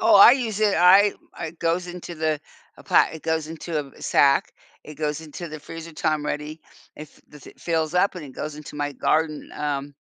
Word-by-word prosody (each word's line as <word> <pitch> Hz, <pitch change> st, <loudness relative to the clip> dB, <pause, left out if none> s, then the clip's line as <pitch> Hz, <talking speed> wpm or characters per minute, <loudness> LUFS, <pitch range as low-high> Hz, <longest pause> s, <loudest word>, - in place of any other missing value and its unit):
Oh, -, -, +6 dB
I 200 Hz, +4 st, +10 dB
use 230 Hz, -6 st, -1 dB
it. 210 Hz, -2 st, +3 dB
I 195 Hz, +4 st, +6 dB, 0.3 s
it 160 Hz, +1 st, -6 dB
goes 170 Hz, +2 st, 0 dB
into 175 Hz, -1 st, -8 dB
the 155 Hz, -2 st, -1 dB, 0.4 s
a -, -, -14 dB
plat -, -, +3 dB
it 160 Hz, -, -9 dB
goes 160 Hz, -1 st, -1 dB
into 165 Hz, 0 st, -4 dB
a -, -, -1 dB
v 135 Hz, -, -17 dB
sack. 140 Hz, -1 st, +3 dB, 0.3 s
It 155 Hz, -, -10 dB
goes 150 Hz, 0 st, -2 dB
into 160 Hz, +2 st, -8 dB
the 155 Hz, -1 st, -8 dB
freezer 165 Hz, +2 st, -9 dB
time 155 Hz, -1 st, -1 dB
ready. 150 Hz, +2 st, -4 dB, 0.4 s
If 150 Hz, -1 st, -12 dB
the 150 Hz, -, -14 dB
th -, -, -14 dB
fills 160 Hz, -1 st, -1 dB
up, 185 Hz, +2 st, +3 dB
and 175 Hz, -4 st, -7 dB
it 140 Hz, -, -10 dB
goes 150 Hz, +3 st, -6 dB
into 150 Hz, -1 st, -10 dB
my 145 Hz, 0 st, -2 dB
garden, 155 Hz, +3 st, 0 dB
um, 145 Hz, -1 st, -3 dB
160 Hz, 215 wpm, -24 LUFS, 150-175 Hz, 0.4 s, I